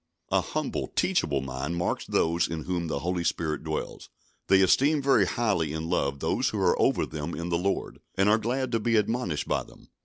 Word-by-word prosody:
A - - +4
humble, - - -3
teachable 70 -3 0
mind 65 +5 -4
marks 85 0 -2
those 85 +1 +1
in 80 -2 -4
whom 90 -2 -2
the 75 -3 -2
Holy 90 +1 -1
Spirit 80 -3 -1
dwells. 80 -1 -5 0.4
They 95 0 +5
esteem 140 - +4
very 135 -9 +3
highly 90 -9 0
in 80 +2 -4
love 70 -5 0
those - - +1
who - - -4
are - - +3
over - - +2
them 75 +2 -5
in 85 +1 -4
the 85 - +1
Lord, 100 +2 -2 0.2
and 100 +1 +3
are 110 +2 +4
glad 130 +2 -1
to 115 - +1
be 115 +1 +1
admonished 110 -6 0
by - - +1
them. - - -16
85 Hz, 205 wpm, -27 LUFS, 80-110 Hz, 0.4 s, They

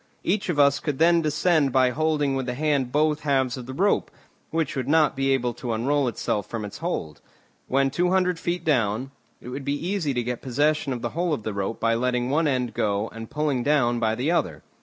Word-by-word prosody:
Each 195 +1 0
of 170 - 0
us 140 -1 +4
could 150 -4 -3
then 170 +2 +4
descend 155 -1 +2
by 130 -1 +3
holding 150 -1 0
with 130 -1 -2
the 125 - -2
hand 140 -3 0
both 150 +1 +2
halves 135 -4 +1
of 125 -2 -8
the 130 - -6
rope, 200 +5 +1 0.4
which 160 -2 -1
would 130 -2 -2
not 155 0 +3
be 135 0 0
able 125 -3 +1
to 120 0 -4
unroll 135 +5 +1
itself 105 -2 -2
from 115 -3 -4
its 100 - -8
hold; 150 - -4 0.5
when 135 +1 +2
two 175 +5 +1
hundred 180 -2 +1
feet 175 0 -2
down, 125 -3 +1 0.3
it - - -9
would 135 +2 -5
be 140 +1 -1
easy 175 -9 -1
to 120 - 0
get 125 0 -4
possession 145 +3 0
of 125 -2 -4
the 120 - -1
whole 170 +1 0
of 110 - -9
the 110 - -3
rope 100 +3 -3
by 115 0 +2
letting 125 +1 0
one 155 +2 +2
end 125 -4 -1
go 105 +1 -1
and 115 -1 -8
pulling 150 -4 -1
down 120 -4 +2
by 110 -1 +1
the 130 +8 0
other. 80 - -1
135 Hz, 225 wpm, -25 LUFS, 120-155 Hz, 0.5 s, us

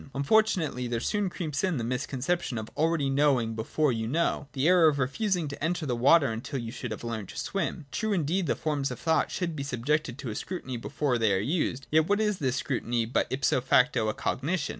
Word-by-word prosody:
Unfortunately 150 - +2
there 120 -1 -1
soon 205 - 0
creeps 155 -5 -3
in 185 -5 +1
the 120 - -2
misconception 130 +4 -2
of 110 0 -6
already 160 -2 +1
knowing 135 -5 +2
before 130 +6 0
you 110 -2 -2
know, 150 +1 0
— - - -37
the 135 +2 +1
error 180 -2 +6
of 150 -2 +2
refusing 170 - 0
to 140 0 -7
enter 165 0 -1
the 125 -4 -1
water 140 +3 +5
until 115 +5 -4
you 115 -2 -5 0.2
have 110 - -6
learnt 110 -4 -4
to - - -9
swim. 175 -4 -3
True, 220 0 -1
indeed, 175 0 0
the - - +1
forms 145 -3 -1
of 125 - -6
thought 160 -1 +1
should 170 -3 -3
be 140 - -4
subjected 140 0 -1
to 130 -5 -5
a - - -6
scrutiny 130 -7 -5
before 125 +1 -1
they 110 -2 +3
are 95 - +3
used: 135 - -1
yet 160 +1 +4
what 205 +1 +2
is 210 -3 0
this 130 -3 0
scrutiny 120 -3 -1
but 115 - 0
ipso 130 -1 +1
facto 125 -3 +3
a 110 - -3
cognition 150 +3 -1
140 Hz, 220 wpm, -28 LUFS, 125-165 Hz, 0.2 s, error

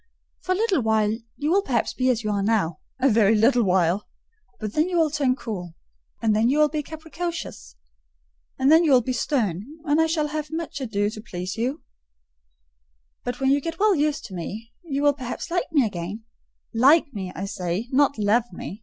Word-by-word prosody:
"For 370 - 0
a - - -1
little 400 - +1
while 220 -1 +2 0.2
you 300 +2 -1
will 395 +3 +4
perhaps 250 - -1
be 255 0 +1
as 235 -2 +1
you 215 - -1
are 200 -1 0
now,—a 200 - 0
very 220 -3 +4
little 240 +3 +4
while; 185 -1 +1 0.5
and 215 -2 -4
then 310 - +1
you 355 - 0
will 320 -3 +3
turn 280 -4 +1
cool; 180 - -6 0.5
and 220 -2 +3
then 225 +3 +3
you 280 - +2
will 305 0 +5
be 305 0 -2
capricious; 315 - -6 0.8
and 270 +3 +3
then 325 +2 +7
you 305 -4 +4
will 250 -2 +5
be 255 - -2
stern, 215 - -1 0.2
and 300 +1 +3
I 320 - +3
shall 310 -2 0
have 305 0 -4
much 320 -2 -5
ado 205 -4 -1
to 215 - -8
please 185 -3 -5
you: 255 +7 -2 1.4
but 245 0 -4
when 270 0 +2
you 285 +1 +3
get 330 +3 -5
well 425 0 +4
used 300 -5 0
to 210 - -10
me, 210 +6 -6
you 285 -4 -2
will 290 0 +5
perhaps 260 +4 -6
like 355 -2 -1
me 285 -6 +4
again,—like 225 - 0
me, 190 -4 -5
I 190 - -4
say, 185 +3 -3
not 280 0 +3
love 220 +3 +1
me. 190 +3 -8
245 Hz, 200 wpm, -24 LUFS, 210-300 Hz, 1.4 s, then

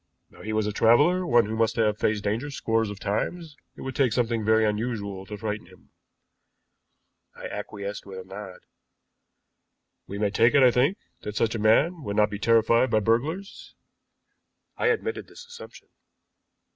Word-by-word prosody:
Now - - -16
he 110 - -5
was 110 -1 0
a 105 - -1
traveler, 145 - +3
one 120 -2 +4
who 110 +2 -4
must 115 0 +1
have 105 -2 +1
faced 105 -1 0
danger 115 +8 -2
scores 115 -5 -1
of 105 -1 -8
times; 150 - -3 0.2
it - - -12
would 130 -1 -5
take 130 -6 +2
something 115 -2 0
very 110 +1 +3
unusual 105 -3 -3
to 105 - -7
frighten 105 -2 -4
him." 95 0 -20 1.4
I - - -10
acquiesced 100 0 -6
with 95 -1 -8
a 95 - -7
nod. 95 0 -10 1.5
"We 100 - -6
may 105 -1 0
take 115 +4 +3
it, 140 - +6
I 125 - +7
think, 140 - +2 0.2
that 105 - -6
such 110 +1 +1
a 115 - -3
man 145 +11 +3
would 100 -7 -4
not 105 -1 +3
be 105 - -5
terrified 115 +2 +3
by 110 - +3
burglars." 145 - -2 1.0
I - - 0
admitted 450 -1 -1
this 485 - -13
assumption. 475 0 -13
110 Hz, 170 wpm, -26 LUFS, 105-130 Hz, 1.5 s, I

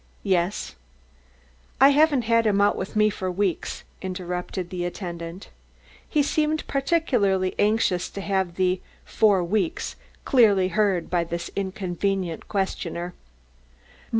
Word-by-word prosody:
"Yes." 185 - 0 1.1
"I 270 +2 +8
haven't 290 -2 +4
had 230 0 +3
him 200 -1 +2
out 205 0 +4
with 190 - -5
me 215 0 +4
for 185 -2 -3
weeks," 185 -2 -2 0.2
interrupted 180 -1 -4
the 180 -1 -3
attendant. 175 0 -6 0.6
He 300 -2 +2
seemed 305 +1 0
particularly 245 - +1
anxious 205 -4 +2
to 200 - -6
have 190 -3 -1
the 185 0 +1 0.2
"for 200 -4 +3
weeks" 215 - -1 0.3
clearly 205 -8 +4
heard 190 -3 +1
by 175 -1 +2
this 170 +1 -5
inconvenient 190 -2 -2
questioner. 180 -3 -3
195 Hz, 120 wpm, -24 LUFS, 180-215 Hz, 1.1 s, I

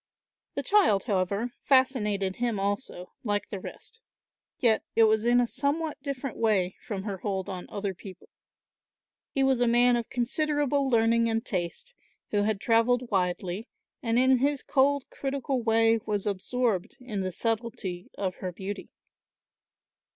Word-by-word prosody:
The - - -2
child, 385 - +4
however, 200 +2 -1
fascinated 210 -8 +2
him 235 -4 -1
also, 200 -2 -3
like 205 -3 -1
the 200 - -5
rest. 450 - -11 0.6
Yet 225 -3 +3
it 225 - +6
was 220 0 +3
in 240 +1 +5
a 245 - +3
somewhat 285 +5 -2
different 275 -2 -4
way 195 -5 +1
from 200 -5 -5
her 200 -3 -4
hold 190 -2 -3
on 180 -1 -6
other 200 -1 -3
people. 185 +1 -12 1.0
He 270 - 0
was 265 -2 +2
a 245 - +4
man 240 +1 +5
of 235 -1 -2
considerable 285 +2 0
learning 230 -1 +3
and 225 +1 -1
taste, 185 - -3 0.4
who 205 - +2
had 210 -1 0
travelled 235 +2 +2
widely, 185 +2 -1 0.3
and 230 -3 0
in 260 0 +5
his 280 +1 +1
cold 280 0 +2
critical 270 -1 -2
way 225 0 +3
was 205 -2 -1
absorbed 210 +1 -1
in 225 -6 -4
the 185 0 -2
subtlety 215 -4 -3
of 190 -2 -2
her 185 - -4
beauty. 195 +3 -6
225 Hz, 150 wpm, -28 LUFS, 200-255 Hz, 1.0 s, it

